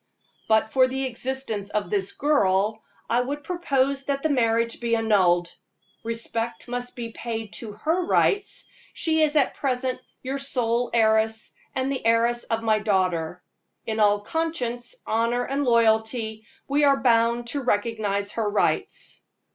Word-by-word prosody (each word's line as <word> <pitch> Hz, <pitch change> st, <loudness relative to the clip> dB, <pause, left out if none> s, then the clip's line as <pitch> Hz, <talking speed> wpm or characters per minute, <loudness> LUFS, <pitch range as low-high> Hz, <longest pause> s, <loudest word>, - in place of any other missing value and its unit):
But 220 Hz, 0 st, +2 dB
for 260 Hz, -1 st, +5 dB
the 265 Hz, +1 st, -3 dB
existence 250 Hz, -5 st, -4 dB
of 205 Hz, -4 st, -2 dB
this 200 Hz, -2 st, 0 dB
girl, 215 Hz, -7 st, +1 dB, 0.3 s
I 235 Hz, +2 st, +2 dB
would 285 Hz, +3 st, -4 dB
propose 275 Hz, -5 st, 0 dB
that 275 Hz, -1 st, -2 dB
the 315 Hz, -, +2 dB
marriage 230 Hz, -3 st, +1 dB
be 235 Hz, -1 st, +1 dB
annulled. 185 Hz, -6 st, +2 dB, 0.5 s
Respect 230 Hz, +1 st, -3 dB
must 245 Hz, 0 st, -4 dB
be 235 Hz, -2 st, -5 dB
paid 225 Hz, -2 st, -5 dB
to 220 Hz, -3 st, -7 dB
her 325 Hz, -, -1 dB
rights; 410 Hz, +6 st, +1 dB, 0.3 s
she 320 Hz, -1 st, +1 dB
is 305 Hz, -1 st, +2 dB
at 285 Hz, -4 st, +3 dB
present 255 Hz, -1 st, -1 dB, 0.2 s
your 270 Hz, +1 st, -3 dB
sole 245 Hz, -3 st, 0 dB
heiress, 220 Hz, -1 st, +2 dB, 0.2 s
and 260 Hz, +1 st, 0 dB
the 270 Hz, -, -3 dB
heiress 230 Hz, +1 st, +2 dB
of 225 Hz, 0 st, -2 dB
my 215 Hz, -1 st, +3 dB
daughter. 180 Hz, -5 st, 0 dB, 0.4 s
In 220 Hz, -1 st, -2 dB
all 205 Hz, -1 st, +4 dB
conscience, 260 Hz, -, -2 dB
honor 230 Hz, +2 st, +1 dB
and 275 Hz, +3 st, -1 dB
loyalty, 220 Hz, -1 st, +1 dB, 0.2 s
we 285 Hz, +2 st, +2 dB
are 280 Hz, -1 st, +5 dB
bound 235 Hz, -1 st, +3 dB
to 285 Hz, +4 st, -2 dB
recognize 205 Hz, -3 st, 0 dB
her 220 Hz, -2 st, -1 dB
rights." 205 Hz, -, 0 dB
230 Hz, 145 wpm, -25 LUFS, 220-265 Hz, 0.5 s, for